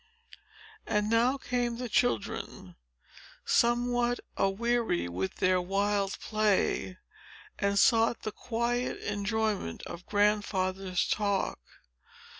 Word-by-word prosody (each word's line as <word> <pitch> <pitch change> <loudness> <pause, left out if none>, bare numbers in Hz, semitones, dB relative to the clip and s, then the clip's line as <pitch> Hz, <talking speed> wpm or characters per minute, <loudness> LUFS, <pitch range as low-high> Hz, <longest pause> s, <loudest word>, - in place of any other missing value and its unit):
And 210 +1 0
now 240 +4 +3
came 245 -3 -2
the 250 0 -4
children, 115 - -1 0.7
somewhat 240 0 +2 0.2
aweary 220 - 0
with 90 +2 -3
their 185 0 +2
wild 195 +1 0
play, 210 -3 0 0.6
and 200 0 +1
sought 225 +2 +4
the 215 - -3
quiet 240 +2 -2
enjoyment 205 - -2
of 170 +1 -9
Grandfather's 195 -3 +1
talk. 200 - 0
210 Hz, 90 wpm, -29 LUFS, 190-235 Hz, 0.7 s, sought